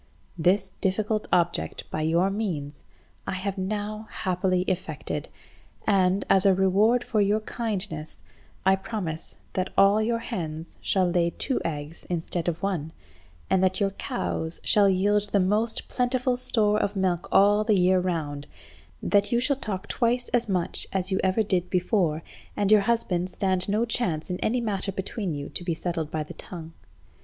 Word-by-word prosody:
This 185 +3 +2
difficult 210 +3 0
object, 175 -1 0
by 155 - -2
your 170 +5 +2
means, 160 -9 -3 0.5
I - - -1
have 190 +1 -3
now 210 +2 -3
happily 185 -1 0
effected, 185 -1 -3 0.6
and, 190 -1 +2
as 190 - +4
a 195 -2 +5
reward 205 +6 +3
for 215 -3 +1
your 205 +2 +2
kindness, 190 -9 -4 0.4
I 190 0 +5
promise 185 -6 -4 0.2
that 185 0 -1
all 200 +2 +6
your 230 +2 +1
hens 165 -9 -5
shall 185 -2 +2
lay 175 -1 +2
two 260 +9 -1
eggs 150 0 -5
instead 170 0 -2
of 170 +1 -2
one, 170 -6 -2 0.5
and 190 - +2
that 185 0 +2
your 200 -1 +1
cows 160 - -3
shall 205 -2 +5
yield 205 +2 +2
the 200 - +2
most 210 +5 0
plentiful 250 0 0
store 215 -4 +2
of 205 - -1
milk 185 -3 0
all 205 +2 +5
the 215 -2 +3
year 185 +1 +4
round, 150 -5 -3 0.6
that 205 0 +2
you 235 - +3
shall 280 +3 +3
talk 205 -8 -4
twice 245 0 0
as 240 -2 +1
much 180 -3 0
as 190 0 -1
you 190 - +1
ever 190 +4 +2
did 185 -4 0
before, 180 -4 +1 0.3
and 205 0 +1
your 215 -1 +7
husband 195 -5 0
stand 185 0 0
no 215 +3 +2
chance 180 -9 -1
in 180 - -3
any 245 +2 0
matter 200 -3 -1
between 190 -2 -3
you 145 0 -5
to - - -1
be 170 -2 -1
settled 165 -2 -3
by 155 -1 -2
the 150 - -10
tongue. 165 -3 -9
190 Hz, 165 wpm, -26 LUFS, 175-210 Hz, 0.6 s, your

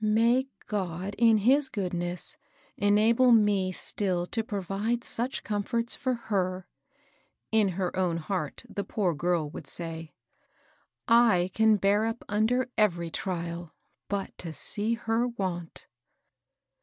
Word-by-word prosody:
*^ - - -8
May 230 +5 +3 0.2
God, 190 -1 -3
in 230 -2 +6
his 265 +6 +3
goodness, 175 -3 -3 0.4
enable 220 +5 +4
me 205 -4 +4
still 185 -1 -2
to 225 +5 -2
provide 205 +3 -2
such 245 +3 -2
comforts 230 +3 -1
for 255 -2 -1
her! 185 -5 -2 0.4
" - - -41
in 220 -2 +4
her 185 -2 -1
own 180 -3 +1
heart, 160 -2 -3
the 200 - -4
poor 195 -5 0
girl 165 -1 0
would - - -8
say. 165 -2 -5 1.0
I 225 -7 +5
can 220 -1 +5
bear 205 +2 +3
up 225 +1 -4
under 235 +4 +1
every 170 -5 +2
trial 170 -3 -4 0.3
but 200 -1 -3
to 165 -3 -5
see 215 +7 -2
her 230 +1 0
want 185 -8 -4
205 Hz, 130 wpm, -28 LUFS, 175-225 Hz, 1.0 s, in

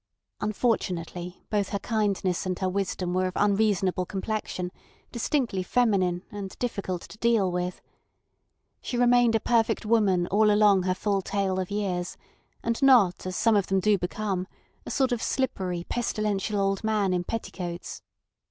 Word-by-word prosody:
Unfortunately, 180 -5 -2
both 205 -2 +1
her 200 - -1
kindness 200 -4 -1
and 185 -1 -1
her 190 - -1
wisdom 185 -1 -2
were 185 0 +1
of 185 - -5
unreasonable 200 -3 +2
complexion, 190 -3 -3 0.4
distinctly 235 -4 -1
feminine, 185 -4 +1
and 200 -2 -7
difficult 200 -7 -3
to 215 - -13
deal 225 -6 +2
with. 180 0 -3 1.0
She 245 - -3
remained 245 -1 +4
a - - +3
perfect 230 0 +1
woman 205 -5 +3
all 210 +2 +4
along 205 -2 +5
her 185 0 0
full 200 +1 0
tale 195 -1 -1
of 185 - -3
years, 190 -4 -2 0.5
and 230 0 -1
not 235 -10 +5
as 185 - -4
some 225 +2 +3
of 200 -2 +2
them 195 0 +2
do 210 +2 +3
become—a 190 0 -5
sort 265 -2 +1
of 240 -2 -1
slippery, 185 -9 -1
pestilential 215 -3 -1
old 195 +1 0
man 210 -4 +1
in 180 -1 0
petticoats. 180 -4 -5
200 Hz, 150 wpm, -27 LUFS, 185-220 Hz, 1.0 s, along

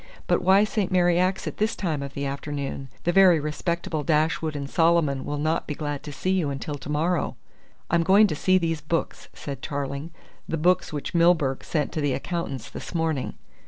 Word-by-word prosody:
"But - - +2
why 190 +3 +5
St. 210 -2 -1
Mary 175 -1 +3
Axe 185 +1 +1
at - - -5
this 215 +2 0
time 160 -7 -2
of 140 0 -7
the 140 - -2
afternoon? 140 -1 -4
The 175 - +2
very 185 -3 +6
respectable 155 +1 -2
Dashwood 155 +1 +1
and 140 -1 -4
Solomon 160 -4 +2
will 145 - -3
not 155 +3 0
be 150 - -3
glad 145 -2 -4
to 150 - -8
see 185 +6 -2
you 180 -6 +1
until 140 +2 -4
to 145 0 -7
morrow." 160 +3 0 0.6
"I'm 170 0 +4
going 195 +6 +6
to 175 - -1
see 185 +5 +3
these 165 -3 -1
books," 165 +1 -3
said 140 -3 -6
Tarling, 140 +2 -4 0.4
"the 165 - -1
books 180 +4 +2
which 150 +3 -4
Milburgh 165 -6 +3
sent 150 -3 -1
to 155 - -2
the 145 -2 +1
accountants 140 -9 -4
this - - -8
morning." 160 -5 -1
155 Hz, 195 wpm, -25 LUFS, 145-175 Hz, 0.6 s, very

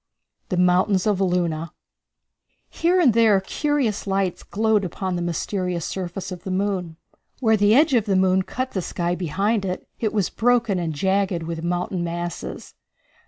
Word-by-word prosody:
The 185 - -1
Mountains 180 +2 +3
of 205 -3 +1
Luna. 170 -3 0 1.0
Here 350 +3 +2
and 275 -10 +5
there 220 -3 +5
curious 255 0 -1
lights 195 -2 0
glowed 215 -1 +1
upon 185 +1 -3
the 175 - -2
mysterious 175 0 -2
surface 185 0 -5
of 180 -1 -7
the - - -5
moon. 185 -3 -2 0.4
Where 220 -4 +3
the 205 +1 +4
edge 300 +1 +4
of 230 -4 +3
the 200 -3 +1
moon 185 0 +3
cut 255 +7 -4
the 190 - -2
sky 175 0 -2
behind 195 +5 0
it, 185 -1 -4
it 220 -3 0
was 205 -4 0
broken 235 -5 +2
and 170 -2 -2
jagged 190 +1 0
with 165 0 -5
mountain 175 +1 -1
masses. 175 0 -5
190 Hz, 165 wpm, -23 LUFS, 175-215 Hz, 1.0 s, and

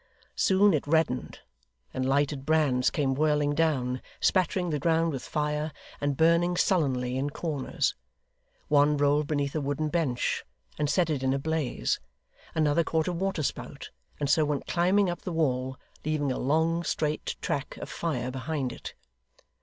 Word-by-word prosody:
Soon 195 +1 +4
it 145 -2 -1
reddened, 155 -5 0 0.5
and 130 0 -1
lighted 140 0 +1
brands 140 -5 +3
came 135 -3 0
whirling 150 0 +2
down, 135 -5 0 0.2
spattering 180 -1 +1
the 150 - 0
ground 165 +2 +2
with 135 -3 -4
fire, 150 +1 -2 0.3
and 145 -2 0
burning 170 +2 +3
sullenly 130 -10 +1
in 140 +2 -1
corners. 145 -2 -1 0.7
One 145 0 +4
rolled 145 +1 +2
beneath 145 -2 -1
a 155 - -1
wooden 145 +2 -1
bench, 150 -7 0 0.4
and 150 -1 +1
set 165 +2 +2
it 145 -4 -1
in 130 0 +1
a - - +1
blaze; 155 -2 -1 0.6
another 155 +1 +3
caught 160 0 0
a 180 - 0
water 185 -2 -1
spout, - - -5 0.3
and 145 - 0
so 155 +3 +4
went 145 -2 -1
climbing 185 +3 +2
up 175 -1 -3
the 185 - -5
wall, 130 -5 0 0.3
leaving 150 -2 0
a - - -2
long 160 +5 +2
straight 155 -2 -1
track 140 - -3
of - - -6
fire 130 -7 -2
behind 135 -1 -3
it. - - -9
150 Hz, 160 wpm, -28 LUFS, 140-165 Hz, 0.7 s, Soon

